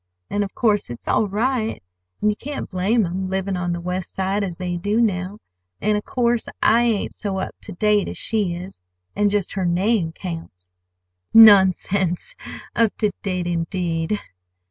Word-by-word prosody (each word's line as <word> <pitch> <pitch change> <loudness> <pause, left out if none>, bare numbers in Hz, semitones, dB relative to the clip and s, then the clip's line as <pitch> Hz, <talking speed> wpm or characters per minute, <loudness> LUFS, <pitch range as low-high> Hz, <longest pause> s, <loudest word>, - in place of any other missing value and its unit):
And 205 - +1
of 195 - -7
course 210 -4 +1
it's 120 - -9
all 215 - +2
right, 220 - -1 0.4
and 210 - +3
you - - -3
can't 285 +5 -5
blame 200 +4 +2
'em, 185 +2 -3
livin' 190 0 -1
on 180 -1 -2
the 175 - -2
West 180 +1 -4
Side, 195 +2 0
as 180 -4 -3
they 180 -1 -3
do 205 +6 0
now. 195 -3 0 0.4
And, 210 - +1
of 210 - -2
course, 240 -2 0
I 230 +2 +4
ain't 230 -4 0
so 200 -2 -3
up 190 - -3
ter - - -8
date 210 +2 +2
as - - -7
she 205 -6 -1
is. 175 - -9 0.3
And 205 0 +3
just 200 -2 0
her 195 - -2
name 180 0 +1
counts." 165 - -8 0.6
"Nonsense! 195 - +6 0.4
Up 230 -2 +2
to 210 -2 +1
date, 185 -3 -2
indeed!" 170 +2 -1
195 Hz, 170 wpm, -22 LUFS, 180-210 Hz, 0.6 s, Nonsense